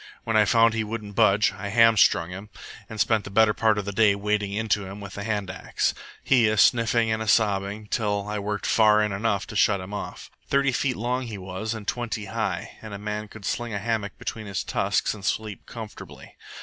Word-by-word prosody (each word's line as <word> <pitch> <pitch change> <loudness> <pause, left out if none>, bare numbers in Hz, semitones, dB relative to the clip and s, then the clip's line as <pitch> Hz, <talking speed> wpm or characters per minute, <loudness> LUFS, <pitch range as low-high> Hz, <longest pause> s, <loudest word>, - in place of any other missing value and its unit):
When 110 - -1
I 105 -1 +5
found 115 +2 +4
he 110 -1 0
wouldn't 105 -1 -6
budge, 100 +2 +4
I 100 +1 -6
hamstrung 110 -6 +4
him, 100 +3 -8 0.4
and 110 - -8
spent 110 -1 +2
the - - -8
better 110 +1 +4
part 110 -1 +2
of 105 - -2
the 100 - -3
day 100 0 +4
wading 105 0 -1
into 105 0 0
him 95 +2 -8
with 100 -2 -9
the 100 - -6
hand 100 -3 -2
axe, 95 - -1 0.3
he 125 -4 +4
a 110 0 +1
sniffing 115 +1 +3
and 110 -1 -1
sobbing 100 0 +1
till 105 -1 -1
I 105 0 -3
worked 105 +1 -3
in - - -1
far 105 -1 +5
enough 100 0 -1
to - - -10
shut 100 0 +3
him 95 +2 -8
off. 105 - -7 0.2
Thirty 140 -1 +2
feet 125 0 0
long 125 +2 -2
he 110 -3 -6
was, 95 +4 -5
and 105 -2 -8
twenty 120 -3 -3
high, - - -4
and 110 -2 -7
a - - -5
man 105 +1 -4
could 105 -1 -11
sling 120 -3 -2
a - - 0
hammock 105 -1 -2
between 110 -2 -6
his 100 -1 -3
tusks - - 0
and 100 - -11
sleep 110 0 -3
comfortably. 110 -3 -10
105 Hz, 215 wpm, -25 LUFS, 100-110 Hz, 0.4 s, I